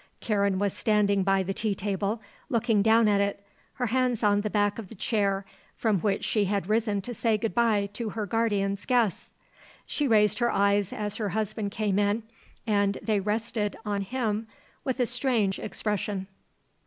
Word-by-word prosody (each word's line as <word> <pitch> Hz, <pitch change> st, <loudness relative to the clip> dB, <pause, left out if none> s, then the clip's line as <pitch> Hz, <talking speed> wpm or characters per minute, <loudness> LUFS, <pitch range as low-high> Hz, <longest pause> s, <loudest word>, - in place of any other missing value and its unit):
Karen 200 Hz, -3 st, +1 dB
was 200 Hz, 0 st, 0 dB
standing 205 Hz, -2 st, +2 dB
by 195 Hz, 0 st, +2 dB
the 195 Hz, +1 st, -2 dB
tea 210 Hz, -1 st, -1 dB
table, 200 Hz, +3 st, -2 dB, 0.3 s
looking 225 Hz, -3 st, +2 dB
down 225 Hz, +1 st, +5 dB
at 200 Hz, -1 st, +3 dB
it, 200 Hz, 0 st, -2 dB, 0.3 s
her 250 Hz, -, -2 dB
hands 245 Hz, -1 st, +1 dB
on 205 Hz, -1 st, +4 dB
the 215 Hz, -, -2 dB
back 205 Hz, 0 st, +1 dB
of 215 Hz, -, -7 dB
the -, -, -10 dB
chair 200 Hz, -2 st, 0 dB, 0.3 s
from 215 Hz, -4 st, +1 dB
which 200 Hz, +1 st, 0 dB
she 210 Hz, -2 st, +2 dB
had 200 Hz, -1 st, -1 dB
risen 215 Hz, -2 st, +1 dB
to 245 Hz, +5 st, -6 dB
say 225 Hz, -1 st, +1 dB
good 225 Hz, 0 st, -2 dB
bye 220 Hz, -4 st, +2 dB
to 230 Hz, 0 st, -3 dB
her 215 Hz, 0 st, -3 dB
guardian's 200 Hz, -2 st, 0 dB
guests. 235 Hz, -8 st, +1 dB, 0.6 s
She 295 Hz, -, -1 dB
raised 210 Hz, -3 st, +3 dB
her 240 Hz, -1 st, +2 dB
eyes 200 Hz, -1 st, +2 dB
as 210 Hz, -1 st, -3 dB
her 210 Hz, -3 st, -1 dB
husband 215 Hz, 0 st, -2 dB
came 205 Hz, -1 st, 0 dB
in 205 Hz, +2 st, +1 dB, 0.4 s
and 200 Hz, -3 st, +2 dB
they 215 Hz, -2 st, +1 dB
rested 210 Hz, +1 st, -1 dB
on 205 Hz, -1 st, -1 dB
him 220 Hz, 0 st, -2 dB, 0.4 s
with 260 Hz, -1 st, -2 dB
a 250 Hz, -, +3 dB
strange 240 Hz, -5 st, 0 dB
expression. 205 Hz, -2 st, -2 dB
210 Hz, 180 wpm, -27 LUFS, 200-225 Hz, 0.6 s, down